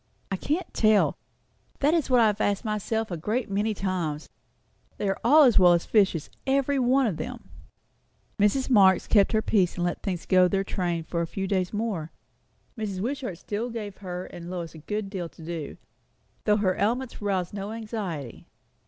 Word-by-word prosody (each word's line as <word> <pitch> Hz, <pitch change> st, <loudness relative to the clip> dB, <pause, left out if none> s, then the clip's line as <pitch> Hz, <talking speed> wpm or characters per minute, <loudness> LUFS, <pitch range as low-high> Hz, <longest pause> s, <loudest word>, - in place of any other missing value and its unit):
"I -, -, +1 dB
can't 305 Hz, -, -2 dB
tell. 215 Hz, -2 st, +3 dB, 0.6 s
That 290 Hz, +3 st, +2 dB
is 330 Hz, -5 st, +1 dB
what 250 Hz, -1 st, +5 dB
I -, -, +6 dB
have 210 Hz, 0 st, +1 dB
asked 205 Hz, +3 st, 0 dB
myself 215 Hz, 0 st, -2 dB
a 175 Hz, -, -2 dB
great 215 Hz, +7 st, -2 dB
many 210 Hz, +2 st, 0 dB
times. 175 Hz, -6 st, -2 dB, 0.7 s
They 205 Hz, -, -2 dB
are 195 Hz, -, -1 dB
all 295 Hz, +7 st, +7 dB
as 245 Hz, -7 st, +6 dB
well 180 Hz, -1 st, +7 dB
as 170 Hz, -, +1 dB
fishes, 195 Hz, -8 st, +2 dB, 0.2 s
every 275 Hz, +1 st, +2 dB
one 260 Hz, +2 st, +3 dB
of 195 Hz, -9 st, -1 dB
them." 245 Hz, +3 st, -7 dB, 0.9 s
Mrs. 210 Hz, +6 st, +2 dB
Marx 195 Hz, -7 st, +5 dB
held 200 Hz, -3 st, +5 dB
her 220 Hz, 0 st, +2 dB
peace 190 Hz, -5 st, +2 dB
and 175 Hz, -, -2 dB
let 175 Hz, 0 st, -2 dB
things 180 Hz, -4 st, -3 dB
go 185 Hz, -1 st, +5 dB
their 195 Hz, +1 st, 0 dB
train 175 Hz, -4 st, -2 dB
for 170 Hz, +1 st, -3 dB
a 170 Hz, -, -2 dB
few 195 Hz, +3 st, -4 dB
days 185 Hz, -2 st, 0 dB
more. 205 Hz, -7 st, -3 dB, 0.6 s
Mrs. 210 Hz, -5 st, -4 dB
Wishart 245 Hz, -4 st, -3 dB
still 210 Hz, +6 st, -4 dB
gave 215 Hz, -4 st, -6 dB
her 180 Hz, -2 st, -6 dB
and 175 Hz, 0 st, -9 dB
Lois 175 Hz, -3 st, -5 dB
a 160 Hz, -, -11 dB
good 210 Hz, +6 st, -3 dB
deal 185 Hz, -4 st, -5 dB
to 160 Hz, -, -13 dB
do, 165 Hz, -3 st, -5 dB, 0.7 s
though 210 Hz, -1 st, +4 dB
her 190 Hz, -3 st, +1 dB
ailments 240 Hz, +5 st, -1 dB
aroused 190 Hz, -3 st, -1 dB
no 200 Hz, +1 st, -5 dB
anxiety. 210 Hz, -, -5 dB
200 Hz, 190 wpm, -26 LUFS, 180-225 Hz, 0.9 s, all